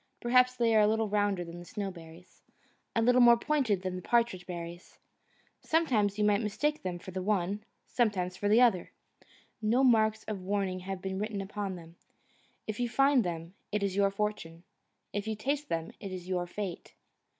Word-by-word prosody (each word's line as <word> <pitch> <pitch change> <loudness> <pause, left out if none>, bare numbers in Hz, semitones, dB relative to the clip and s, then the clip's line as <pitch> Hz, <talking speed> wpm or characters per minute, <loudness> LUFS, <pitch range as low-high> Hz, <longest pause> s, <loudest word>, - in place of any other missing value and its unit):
Perhaps 250 +1 +4
they 230 -2 +2
are - - +6
a 210 - +5
little 220 +1 +1
rounder 205 -3 +1
than 170 +1 -9
the - - -9
Snowberry's, 175 -3 -8 0.5
a 230 - +3
little 250 +2 +5
more 240 -1 +8
pointed 235 - 0
than 185 -1 -3
the 180 - -5
Partridge 230 -5 +1
berry's; 175 0 -8 0.6
sometimes 230 -11 +1
you 210 - +1
might 210 0 +3
mistake 290 +9 -1
them 180 -2 -3
for 185 +2 -10
the 185 +1 -4
one, 200 +1 -1 0.2
sometimes 190 -7 0
for 205 +2 -1
the 220 +3 +6
other. 230 -8 +3 0.7
No 230 +5 +2
marks 220 -3 +3
of 205 -3 -5
warning 190 -1 -1
have 185 0 -6
been 190 0 -3
written 210 -1 -3
upon 195 0 -4
them. 170 -1 -13 0.7
If 215 +1 -5
you 245 -1 0
find 275 0 +4
them 170 -1 -5 0.2
it 210 -1 0
is 195 -2 -1
your 200 0 +3
fortune; 195 -5 -4 0.5
if 205 +1 -3
you 220 - -1
taste 280 +7 -2
them 165 0 -2
it 195 - -7
is 180 -1 -7
your 180 -1 -1
fate. 190 -1 -6
205 Hz, 185 wpm, -30 LUFS, 185-225 Hz, 0.7 s, more